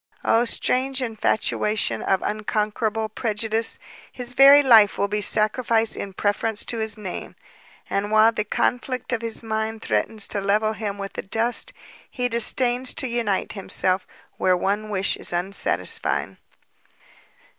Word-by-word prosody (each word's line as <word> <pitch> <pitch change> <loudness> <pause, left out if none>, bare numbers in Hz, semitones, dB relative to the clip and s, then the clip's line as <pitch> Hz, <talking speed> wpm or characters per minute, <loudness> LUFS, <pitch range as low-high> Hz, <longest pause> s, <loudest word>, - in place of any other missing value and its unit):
Oh 230 +2 +3
strange 260 +3 0
infatuation 220 -2 0
of 190 -1 0
unconquerable 215 +1 -2
prejudice! 220 +1 -2 0.3
his 250 -1 -6
very 275 +3 +8
life 220 -6 +6
will 200 - +1
he 210 +1 -1
sacrifice 220 +2 +2
in 195 - -6
preference 205 +2 -1
to 230 - -3
his 220 0 -1
name, 195 -4 -7 0.5
and 200 +1 -2
while 215 +1 +5
the 210 - -2
conflict 250 +4 -2
of 230 - -1
his 230 0 -3
mind 220 0 -3
threatens 160 - 0
to 200 - 0
level 210 +2 +1
him 210 -2 -4
with 195 0 -6
the - - -4
dust, 235 - -1 0.4
he 250 -1 -2
disdains 245 +2 +1
to 260 - -1
unite 230 -5 -1
himself 190 -2 -1 0.3
where 185 -1 +2
one 205 +4 -2
wish 195 -1 0
is - - -3
unsatisfied!" 180 +3 0
220 Hz, 140 wpm, -23 LUFS, 205-235 Hz, 0.5 s, very